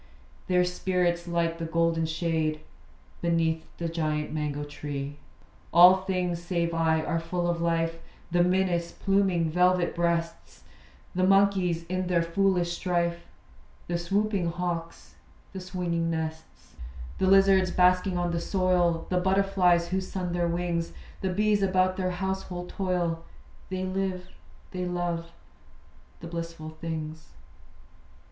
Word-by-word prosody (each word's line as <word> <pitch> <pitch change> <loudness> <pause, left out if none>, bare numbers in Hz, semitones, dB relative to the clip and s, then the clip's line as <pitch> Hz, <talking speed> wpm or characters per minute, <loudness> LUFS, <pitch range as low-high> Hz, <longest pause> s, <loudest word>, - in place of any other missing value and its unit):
Their 180 -1 +3
spirits 180 -1 0
light 170 -1 0
the 165 - -3
golden 165 0 +1
shade 160 -1 -1 0.6
Beneath 165 -1 0
the 170 - -2
giant 155 -2 -2
mango 150 -1 -2
tree. 145 -1 -6 0.5
All 180 +3 +8
things, 180 -2 -2
save 170 -1 -1
I, 160 -1 +2
are 165 0 -1
full 175 +1 -2
of 170 -1 -1
life: 165 0 0 0.3
The 175 0 +4
minas, 180 -2 +1
pluming 190 -5 +1
velvet 180 +1 +3
breasts; 170 -1 -2 0.5
The 185 - 0
monkeys, 190 -3 +3
in 185 +2 -3
their 175 -2 +2
foolish 175 0 +1
strife; 170 -2 -1 0.6
The 170 0 -2
swooping 200 +1 0
hawks, 170 -1 -5 0.4
the 190 - -5
swinging 175 -2 -2
nests; 160 -1 -5 0.5
The 190 - +2
lizards 195 -1 +5
basking 180 +1 +3
on 175 0 0
the 170 0 -1
soil, 180 -3 +1
The 180 - +2
butterflies 185 -2 +2
who 190 +1 0
sun 185 -1 -4
their 175 -1 +1
wings; 170 -1 -2 0.3
The 190 - 0
bees 205 +2 +2
about 185 -1 +2
their 185 -1 0
household 180 -1 -4
toil, 175 -3 -1 0.5
They 185 0 -3
live, 185 -1 -3 0.4
they 180 -1 -3
love, 175 -1 -2 0.9
the 165 - -7
blissful 165 -2 -6
things. 155 -1 -6
175 Hz, 130 wpm, -27 LUFS, 165-185 Hz, 0.9 s, All